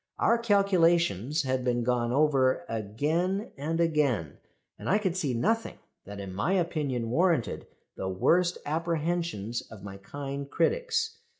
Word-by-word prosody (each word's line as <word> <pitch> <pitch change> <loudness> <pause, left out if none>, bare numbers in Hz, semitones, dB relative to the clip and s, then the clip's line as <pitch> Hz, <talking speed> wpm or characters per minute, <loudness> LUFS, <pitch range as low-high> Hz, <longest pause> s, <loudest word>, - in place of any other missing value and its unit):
Our 235 - +3
calculations 170 - +2
had 130 -1 -1
been 120 -1 0
gone 120 -1 0
over 135 +1 +2
again 155 - -1
and 160 +4 -2
again, 145 - +1 0.4
and - - -5
I 195 - +4
could 190 -5 -1
see 145 -9 -1
nothing 225 - 0 0.3
that 100 0 -8
in 95 -2 -6
my 105 - 0
opinion 150 -10 -1
warranted 165 -3 +1 0.3
the 95 - -3
worst 175 - +2
apprehensions 165 - -1
of 110 -4 -13
my 100 -1 -8
kind 140 +6 -6
critics. 455 - 0
150 Hz, 135 wpm, -28 LUFS, 120-175 Hz, 0.4 s, I